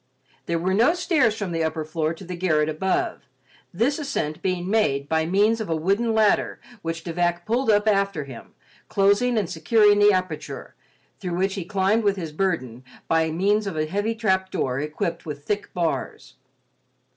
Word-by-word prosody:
There 170 - 0
were 180 +3 0
no 240 - +4
stairs 290 - +2
from 200 -4 -3
the 165 -1 -1
upper 160 0 -2
floor 155 0 -1
to 180 - -12
the 180 0 -6
garret 155 -4 +1
above, 180 +5 -1 0.4
this 240 - 0
ascent 165 - -3
being 185 -1 -1
made 145 -10 +1
by 160 +1 +1
means 210 +5 +2
of 215 - -5
a 165 - +1
wooden 200 +8 +1
ladder 215 -2 +2 0.2
which 165 0 -4
De 170 - -5
Vac 175 0 0
pulled 235 +3 0
up 210 0 +3
after 200 -6 +1
him, 130 -4 -11 0.3
closing 205 +5 +3
and 205 -5 +1
securing 205 +5 +3
the 205 0 +6
aperture, 185 -5 -3 0.5
through 180 -4 -3
which 190 +2 0
he 195 -3 -4
climbed 200 +4 +1
with 200 -1 +2
his 165 -5 -5
burden, 150 -9 -2 0.2
by 160 0 +2
means 200 +6 +1
of 180 -5 -4
a 155 - +1
heavy 205 +7 -1
trapdoor 190 - 0
equipped 155 +3 -3
with 145 -1 -6
thick 205 +2 -2
bars. 170 -3 -3
185 Hz, 180 wpm, -24 LUFS, 160-210 Hz, 0.5 s, the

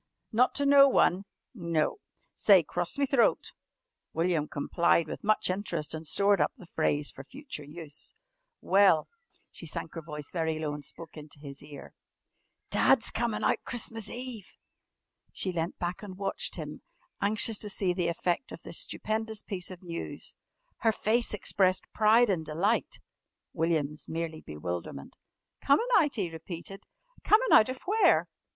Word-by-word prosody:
"Not 245 +3 +3
to 285 - +1
no 280 0 +7
one?" 190 -6 +3 0.3
"No." 170 - -1 0.4
"Say, 195 -5 +6
'Cross 175 - -3
me 280 - +2
throat.'" 270 -4 +2 0.6
William 165 -2 +1
complied 170 +3 +1
with - - -7
much 215 +1 +2
interest 175 -6 -3
and 160 0 -6
stored 200 +4 +3
up - - +2
the 195 - -12
phrase 150 -3 0
for 135 - -10
future 270 - -8
use. 150 0 -10 0.5
"Well," 190 -5 +4 0.4
she 170 - -9
sank 155 - -5
her 165 - -5
voice 150 -2 -8
very 160 -2 -1
low 155 -2 -2
and 145 0 -7
spoke 165 +3 -7
into 150 0 -10
his 140 -1 -9
ear. 145 -1 -11 0.8
"Dad's 270 - +3
comin' 235 -2 -1
out - - +1
Christmas 225 -3 -4
Eve!" 245 -5 -8 0.8
She 185 - -2
leant 170 0 -3
back 175 0 -3
and 195 -3 -9
watched 195 0 -3
him, - - -7 0.4
anxious 215 +1 +4
to 210 - -4
see 190 -2 0
the 175 -1 -1
effect 175 +7 -1
of - - -9
this - - -4
stupendous 220 - -3
piece 180 -3 -4
of 185 -1 -10
news. 170 -1 -6 0.4
Her 225 - +2
face 225 +2 +1
expressed 190 -2 +1
pride 220 +1 +5
and 170 -4 -1
delight, 175 +9 0 0.5
William's 155 -3 -1
merely 160 -1 -4
bewilderment. 75 -2 -6 0.5
"Comin' 285 +12 +4
out?" 300 -7 +4
he 190 -7 -2
repeated. 170 +4 -8 0.4
"Comin' 455 +4 +4
out 215 - +7
of 255 0 -6
where?" 430 +3 +4
180 Hz, 155 wpm, -29 LUFS, 160-220 Hz, 0.8 s, no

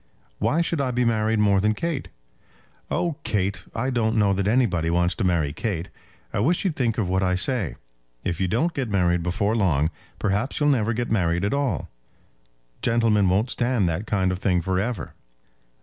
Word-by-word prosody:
"Why 165 - +2
should 165 -3 -1
I 135 - 0
be 125 0 +1
married 110 -1 +1
more 100 -2 +4
than 105 +1 +2
Kate?" 165 +1 -3 0.8
"Oh, 170 -4 -1
Kate! 95 -2 -1
I 130 +4 -1
don't 115 -2 +1
know 100 -2 +3
that 100 0 -1
anybody 105 -8 +2
wants 85 +1 +2
to 115 - -3
marry 85 -6 +1
Kate. 90 -5 -3 0.4
I - - 0
wish 165 - +1
you'd 175 -5 0
think 115 -4 0
of 110 - 0
what 95 +1 +1
I 90 -1 +2
say. 95 - +1 0.5
If 85 0 -2
you 95 - +2
don't 140 - 0
get 135 -6 -2
married 90 -3 +2
before 100 +5 0
long, 80 -7 +2 0.3
perhaps 105 +6 -1
you'll 145 -1 +3
never 115 -5 +2
get 120 0 -3
married 90 -3 +1
at 100 - 0
all. 140 -2 -1 0.9
Gentlemen 115 -4 +3
won't 105 +7 +1
stand 120 -6 +1
that 85 +7 -3
kind 95 -3 +1
of 90 - -3
thing 90 -2 +2
for 95 +1 -1
ever." 110 -2 -3
105 Hz, 190 wpm, -24 LUFS, 90-120 Hz, 0.9 s, more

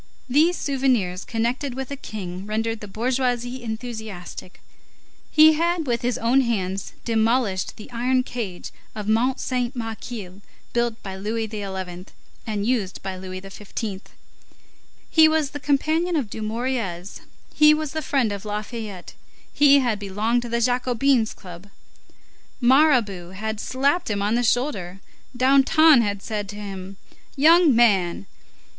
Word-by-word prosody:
These 310 +7 +3
souvenirs 255 - 0
connected 245 +4 -2
with 265 0 -5
a - - -2
king 195 -7 -7
rendered 225 +1 -1
the 210 - -8
bourgeoisie 245 +3 -1
enthusiastic. 220 -6 -7 0.7
He 310 +1 +7
had, 335 +1 0
with 235 -3 -1
his 245 -1 0
own 245 +4 +3
hands, 195 -6 -2
demolished 225 -3 +1
the 215 - -11
iron 255 +2 +1
cage 220 -9 -6 0.2
of 210 -1 -5
Mont 235 +4 +2
Saint 250 0 -2
Michel, 225 -4 -6 0.3
built 235 -1 -1
by 190 -1 -6
Louis 220 +3 -3
XI., 190 -4 -6 0.4
and 210 -2 -2
used 215 -6 -1
by 190 -1 -4
Louis 185 0 -7
XV. 195 +1 -6 1.1
He 320 -1 +6
was 315 -3 +1
the 290 - -6
companion 310 +5 +1
of 255 -10 -1
Dumouriez, 215 -5 -3 0.3
he 300 0 +6
was 305 -1 0
the 315 - -3
friend 265 -6 +1
of 200 -1 -5
Lafayette; 210 -2 -6 0.4
he 285 -1 +6
had 235 -5 0
belonged 210 +4 0
to 240 - -6
the 235 0 0
Jacobins' 250 0 +2
club; 180 +1 -11 0.9
Mirabeau 240 - +3
had 220 +2 -4
slapped 280 +8 0
him 200 -1 -1
on 210 +2 +1
the 240 - +2
shoulder; 220 -7 -1 0.4
Danton 275 +2 +6
had 205 -2 -2
said 210 -3 -4
to 205 - -7
him: 195 -2 -7 0.4
"Young 320 0 +6
man!" 200 -7 +3
230 Hz, 140 wpm, -23 LUFS, 200-260 Hz, 1.1 s, He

